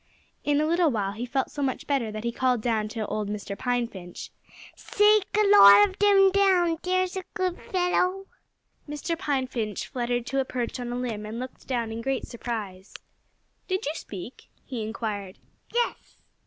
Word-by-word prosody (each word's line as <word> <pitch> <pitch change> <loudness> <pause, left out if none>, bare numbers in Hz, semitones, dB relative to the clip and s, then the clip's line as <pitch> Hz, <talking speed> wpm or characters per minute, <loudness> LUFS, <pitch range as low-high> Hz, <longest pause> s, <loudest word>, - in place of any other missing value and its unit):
In 290 0 +2
a 305 - +2
little 340 +1 +3
while 205 -6 -1
he 230 +4 -5
felt 265 +2 -1
so 290 - -5
much 265 -2 -2
better 265 -6 0
that 215 0 -6
he 235 - -1
called 250 -2 0
out 220 -3 0
to 220 0 -4
Mr. 205 -1 -4
Pine 245 +2 0
Finch: 180 -5 -9 0.4
"Shake 420 -1 +3
a 425 - +4
lot 405 - +9
of 380 - -10
'em 390 -1 +6
down 365 -4 +3
there's 370 0 0
a 380 - -3
good 365 -1 -1
fellow!" 365 +1 +1 0.6
Mr. 295 +3 -3
Pine 290 -6 -1
Finch 220 -5 -3
fluttered 245 -1 -2
to 270 +2 -1
a - - +2
perch 250 -2 -4
on 240 -1 -4
a - - -3
limb 235 -4 -3
and 220 +2 -6
looked 255 +1 -8
down 235 -4 -1
in 225 +1 -5
great 270 +2 -2
surprise. 210 -6 -6 0.7
"Did 375 0 -1
you 295 - -1
speak?" 210 - -9 0.2
he 250 -4 -5
inquired. 215 -3 -4 0.3
"Yes!" 480 0 -2
250 Hz, 180 wpm, -26 LUFS, 220-355 Hz, 0.7 s, lot